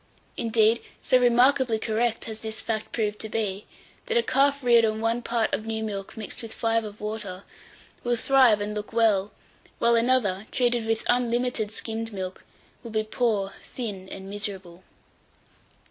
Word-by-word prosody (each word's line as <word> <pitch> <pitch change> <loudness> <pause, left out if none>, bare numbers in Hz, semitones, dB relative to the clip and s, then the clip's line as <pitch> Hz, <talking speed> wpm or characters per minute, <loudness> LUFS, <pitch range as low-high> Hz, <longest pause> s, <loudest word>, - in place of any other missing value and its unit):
Indeed, 225 0 +3 0.2
so 255 - +4
remarkably 245 0 +4
correct 225 +1 -1
has 220 -1 -6
this 220 0 -6
fact 220 -1 -3
proved 210 -2 -1
to 220 - -6
be, 210 -2 -2 0.4
that 475 -1 +1
a 475 - +4
calf 280 - +2
reared 235 -2 +6
on 215 -1 +1
one 230 +2 0
part 235 -2 0
of 220 - -2
new 220 0 -2
milk 200 -2 -5
mixed 215 - -6
with 225 -2 -8
five 230 0 +1
of 210 0 -8
water, 210 -3 -5 0.6
will 240 0 +1
thrive 245 -4 +4
and 205 +1 -2
look 210 +1 -6
well; 215 -3 +3 0.5
while 235 0 +3
another, 230 -4 +2
treated 240 -3 +1
with 225 0 0
unlimited 245 -2 +1
skimmed 225 +1 -4
milk, 185 -2 -6 0.4
will 235 - -8
be 215 -1 0
poor, 215 -3 0
thin, 200 -6 -6
and 190 0 -8
miserable. 190 -3 -7
225 Hz, 160 wpm, -26 LUFS, 210-235 Hz, 0.6 s, reared